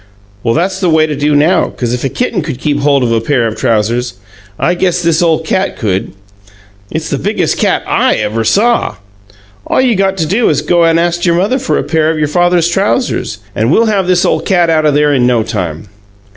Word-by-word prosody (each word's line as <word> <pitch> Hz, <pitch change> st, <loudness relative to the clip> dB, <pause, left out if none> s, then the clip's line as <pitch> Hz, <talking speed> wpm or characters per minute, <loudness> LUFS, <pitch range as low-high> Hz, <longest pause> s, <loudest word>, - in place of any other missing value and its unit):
Well, 115 Hz, +1 st, 0 dB
that's 185 Hz, +3 st, -1 dB
the 185 Hz, -3 st, +1 dB
way 160 Hz, -1 st, +3 dB
to 150 Hz, -1 st, -3 dB
do 145 Hz, +1 st, 0 dB
now, 160 Hz, +6 st, +3 dB
'cause 120 Hz, -1 st, -4 dB
if 125 Hz, -, -3 dB
a 135 Hz, -, 0 dB
kitten 245 Hz, -, -2 dB
could 150 Hz, -5 st, -5 dB
keep 145 Hz, +1 st, -1 dB
hold 140 Hz, -2 st, +2 dB
of 120 Hz, -, 0 dB
a 115 Hz, -1 st, +1 dB
pair 125 Hz, 0 st, 0 dB
of 110 Hz, -1 st, -3 dB
trousers, 115 Hz, +1 st, -1 dB, 0.4 s
I 175 Hz, -, +1 dB
guess 180 Hz, 0 st, 0 dB
this 165 Hz, 0 st, +1 dB
ole 165 Hz, -2 st, +2 dB
cat 185 Hz, +4 st, -2 dB
could. 95 Hz, -5 st, -2 dB, 0.8 s
It's -, -, -4 dB
the -, -, -1 dB
biggest -, -, -1 dB
cat -, -, +1 dB
I -, -, +1 dB
ever 115 Hz, +2 st, -2 dB
saw! 230 Hz, -, +1 dB, 0.7 s
All -, -, +1 dB
you 255 Hz, -2 st, +3 dB
got 195 Hz, -1 st, 0 dB
to 165 Hz, -, 0 dB
do 210 Hz, +9 st, +1 dB
is -, -, +1 dB
to -, -, -15 dB
go 175 Hz, -1 st, +3 dB
and 165 Hz, 0 st, +3 dB
ast 175 Hz, +1 st, 0 dB
your 170 Hz, -, +3 dB
mother 205 Hz, +10 st, 0 dB
for 260 Hz, -, -1 dB
a -, -, -1 dB
pair 160 Hz, 0 st, 0 dB
of 160 Hz, -, -1 dB
your 150 Hz, -1 st, 0 dB
father's 175 Hz, +2 st, +2 dB
trousers, 195 Hz, -, -1 dB, 0.2 s
and 110 Hz, +2 st, 0 dB
we'll 230 Hz, -, +3 dB
have 190 Hz, -3 st, 0 dB
this 180 Hz, -1 st, +2 dB
ole 160 Hz, -, +1 dB
cat 175 Hz, 0 st, +1 dB
out 155 Hz, -1 st, +2 dB
o' -, -, +3 dB
there 145 Hz, 0 st, +2 dB
in 125 Hz, -3 st, +2 dB
no 120 Hz, -3 st, +2 dB
time." 90 Hz, -5 st, -4 dB
160 Hz, 230 wpm, -12 LUFS, 125-180 Hz, 0.8 s, way